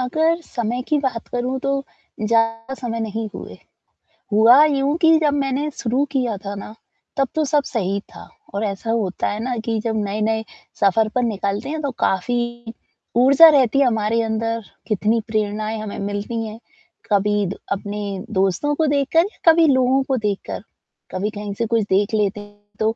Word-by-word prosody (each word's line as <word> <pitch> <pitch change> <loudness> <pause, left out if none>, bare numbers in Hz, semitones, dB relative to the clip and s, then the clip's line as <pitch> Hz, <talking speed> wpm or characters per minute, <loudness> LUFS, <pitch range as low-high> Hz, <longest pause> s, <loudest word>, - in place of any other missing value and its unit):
अगर 315 +7 +1
समय 240 -3 -3
की 305 - +2
बात 260 -5 -3
करूँ 250 +2 -2
तो 275 0 -1 0.4
ज़्यादा 225 +3 +1
समय 235 -3 -4
नहीं 220 0 -3
हुए, - - -8 0.8
हुआ 235 +7 +7
यूँ 280 -1 +1
कि 325 -1 +6
जब 300 -2 +2
मैंने 280 +1 0
शुरू 250 +3 +1
किया 250 -6 0
था 200 +1 -4
ना, 200 +1 -8 0.4
तब 275 -1 +2
तो 310 -1 +1
सब 290 +1 +2
सही 200 -6 -2 0.2
था, - - -11 0.2
और 200 - -2
ऐसा 205 +3 -3
होता 210 -5 -1
है 205 - -3
ना 250 0 -2
कि 225 -1 0
जब 225 -1 0
नए-नए 215 +2 -1 0.4
सफर 210 +2 +3
पर 250 - +2
निकलते 210 +2 -2
हैं, 315 0 -3
तो 285 -2 -2
काफ़ी 240 +2 -2 0.4
ऊर्जा 275 +6 +8
रहती 275 -3 +4
है 280 - +5
हमारे 225 0 +1
अंदर, 225 +1 -1 0.3
कितनी 215 +2 +1
प्रेरणाएँ 215 0 -1
हमें 215 -1 -6
मिलती 205 +3 -3
हैं, 215 +1 -9 0.5
कभी 205 0 +2
द 185 - -5
अपने 200 0 -3
दोस्तों 195 +9 +1
को 320 - +1
देखकर, 285 +3 +3 0.3
कभी 330 0 +6
लोगों 260 -1 +3
को 265 0 -1
देखकर। 210 -3 -3 0.5
कभी 195 +3 -2
कहीं 205 -1 -6
से 230 +3 -2
कुछ 230 0 +2
देख 200 +3 +2
लेते 210 -1 +1
हैं, 205 0 -15 0.2
तो 220 +1 +1
225 Hz, 175 wpm, -21 LUFS, 210-265 Hz, 0.8 s, ऊर्जा